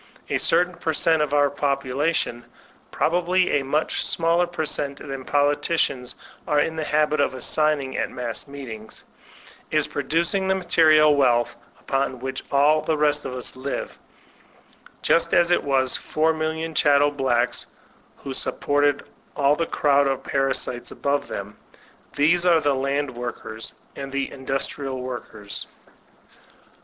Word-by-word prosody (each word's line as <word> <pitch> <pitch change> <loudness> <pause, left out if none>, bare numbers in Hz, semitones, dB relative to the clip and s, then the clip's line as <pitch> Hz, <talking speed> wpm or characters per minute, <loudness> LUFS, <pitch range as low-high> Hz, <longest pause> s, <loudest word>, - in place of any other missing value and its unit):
A - - +1
certain 180 0 +3
per 160 -2 -2
cent, 160 0 +2
of 150 -2 0
our 145 -1 +3
population 140 -2 -1 0.5
(probably 180 -1 +1
a - - -4
much 150 +4 -1
smaller 170 +1 +1
per 175 -2 -3
cent, 140 -1 -2
than 135 -2 -7
politicians 145 -2 0 0.3
are 150 - +2
in 160 +2 0
the 160 - -2
habit 150 0 +1
of 140 -2 +1
assigning 145 0 +1
at - - -1
mass 120 +1 -5
meetings) 120 -6 -9 0.7
is - - +2
produc 170 +5 0
ing 190 -1 0
the 190 - +2
material 155 -4 +5
wealth 120 -3 +2 0.2
upon 135 -1 -1
which 130 +1 -5
all 150 +2 +4
the 155 0 -1
rest 150 0 +1
of 125 - -5
us 125 - -2
live; 135 +2 -5 1.0
just 170 0 +3
as 175 0 +4
it 175 - +3
was 135 -2 +2
the - - -4
4,000,000 160 0 -1
chattel 145 -1 +4
blacks 125 -4 0 0.5
who 135 - -7
supported 145 +1 0 0.3
all 145 0 +3
the 165 +1 -2
crowd 140 -1 +2
of 135 -1 -2
parasites 135 -2 -1
above 140 0 -1
them. 100 +1 -6 0.6
These 170 +4 +3
are 175 -2 +5
the 145 -2 +1
land 140 +1 -1
workers 120 -2 -7 0.2
and 135 0 -6
the 140 0 -2
industrial 135 0 -3
workers. 120 -5 -6
145 Hz, 145 wpm, -23 LUFS, 130-155 Hz, 1.0 s, material